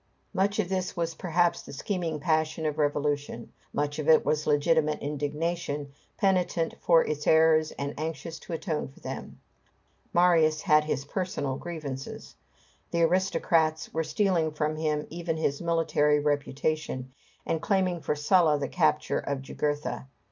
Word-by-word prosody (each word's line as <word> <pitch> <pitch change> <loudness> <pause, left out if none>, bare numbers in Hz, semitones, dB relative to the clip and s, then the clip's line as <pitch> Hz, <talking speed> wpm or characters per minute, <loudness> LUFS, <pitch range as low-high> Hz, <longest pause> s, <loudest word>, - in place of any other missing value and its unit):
Much 200 +2 +1
of 215 -5 +1
this 185 -1 -2
was 165 -1 -1
perhaps 175 0 +1
the - - -11
scheming 165 +1 -3
passion 155 0 0
of 150 -1 -1
revolution; 145 -4 -1 0.2
much 145 +1 -2
of 155 +1 -1
it 160 - +6
was 150 0 0
legitimate 155 +1 +2
indignation, 150 0 -3 0.2
penitent 180 -4 +1
for 165 -2 +5
its 150 -1 -3
errors 160 -1 +5
and 140 0 -4
anxious 160 +1 -5
to - - -11
atone 160 -1 -2
for 135 - -17
them. - - -7 0.7
Marius 165 -3 +4
had 155 -5 +4
his 140 -3 -2
personal 145 -5 -2
grievances. 145 -4 -6 0.6
The 170 0 +1
aristocrats 165 -3 +1
were 160 - 0
stealing 170 -4 +1
from 155 0 -1
him 155 -1 -1
even 165 -1 -3
his 145 -3 -1
military 160 -3 +2
reputation, 145 -2 -1 0.3
and 160 - -1
claiming 185 -5 +1
for 150 - -1
Sulla 155 0 +4
the 140 -1 -2
capture 155 -3 +1
of 140 -1 -3
Jugurtha. 145 0 -3
155 Hz, 145 wpm, -28 LUFS, 145-170 Hz, 0.7 s, it